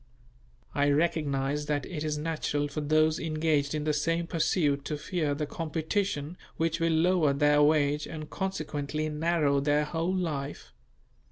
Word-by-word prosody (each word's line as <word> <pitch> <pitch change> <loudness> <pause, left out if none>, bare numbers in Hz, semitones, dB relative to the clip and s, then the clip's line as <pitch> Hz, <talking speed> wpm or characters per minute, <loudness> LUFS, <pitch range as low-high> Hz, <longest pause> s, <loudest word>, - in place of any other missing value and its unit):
I 145 0 +2
recognize 145 -2 0
that 145 -2 -1
it 155 -4 -5
is 150 -1 -1
natural 150 -2 -1
for 145 +1 -4
those 155 +1 +2
engaged 155 -2 0
in 150 - -2
the 150 0 +1
same 165 +3 0
pursuit 160 -4 +1
to 150 - -2
fear 155 -1 -1
the 150 +1 -2
competition 160 +1 -2 0.2
which 165 0 0
will 165 0 +2
lower 160 -2 +3
their 145 +1 +4
wage 150 -1 +3
and 155 -2 -7
consequently 155 -5 -3
narrow 150 -2 +1
their 145 +1 +2
whole 165 +4 -1
life. 150 -6 -4
155 Hz, 150 wpm, -29 LUFS, 145-165 Hz, 0.2 s, their